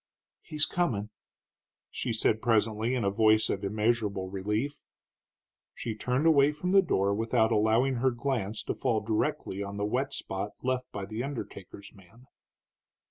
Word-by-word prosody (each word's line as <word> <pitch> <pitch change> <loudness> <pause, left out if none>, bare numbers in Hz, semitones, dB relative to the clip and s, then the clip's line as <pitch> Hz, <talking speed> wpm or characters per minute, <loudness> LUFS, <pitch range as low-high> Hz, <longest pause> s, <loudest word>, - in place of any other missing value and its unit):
"He's 150 -1 0
comin'," 110 -12 -1 0.8
she 120 - -3
said 110 0 +1
presently, 110 +1 +1
in 115 -5 0
voice 110 +1 +3
of 100 - -3
immeasurable 105 -2 0
relief. 105 +9 -2 0.9
She 115 - -4
turned 125 +6 -1
away 145 -3 +5
from 180 +5 -3
the 195 0 +7
door 100 - +1
without 110 +1 +1
allowing 115 +4 +3
her 130 +2 +3
glance 120 -4 -2
to - - -2
fall 115 -5 0
directly 105 -2 -1
on 100 0 -5
the 100 - -1
wet 130 +6 -1
spot 95 +2 -4
left 130 0 -1
by 100 -1 -5
the 110 +4 -4
undertaker's 100 -7 -7
man. 100 +6 -19
110 Hz, 145 wpm, -29 LUFS, 105-130 Hz, 0.9 s, the